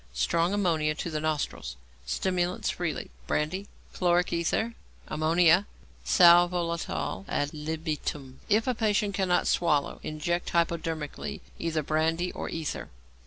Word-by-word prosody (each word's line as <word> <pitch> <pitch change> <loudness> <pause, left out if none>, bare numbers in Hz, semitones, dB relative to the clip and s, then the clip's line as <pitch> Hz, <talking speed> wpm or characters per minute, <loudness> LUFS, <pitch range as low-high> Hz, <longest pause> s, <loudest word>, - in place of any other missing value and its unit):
Strong 165 - +1
ammonia 165 -7 +1
to 170 - -4
the 155 - -1
nostrils. 150 - -2 0.3
Stimulants 180 - 0
freely 165 - -3 0.2
brandy, 185 +7 -1 0.3
chloric 175 -1 +2
ether, 170 +7 0 0.3
ammonia, 170 +4 +4 0.4
sal 175 -1 +7
volatile 170 - -2
ad 145 0 -1
libitum. 150 -3 -4
If 215 +2 +3
patient 210 -2 +1
cannot 185 -2 +2
swallow, 150 -5 +1
inject 170 +3 -2
hypodermically 165 -3 -2 0.2
either 160 -2 -1
brandy 160 +4 0
or - - -5
ether. 160 -3 -4
165 Hz, 115 wpm, -28 LUFS, 155-180 Hz, 0.4 s, sal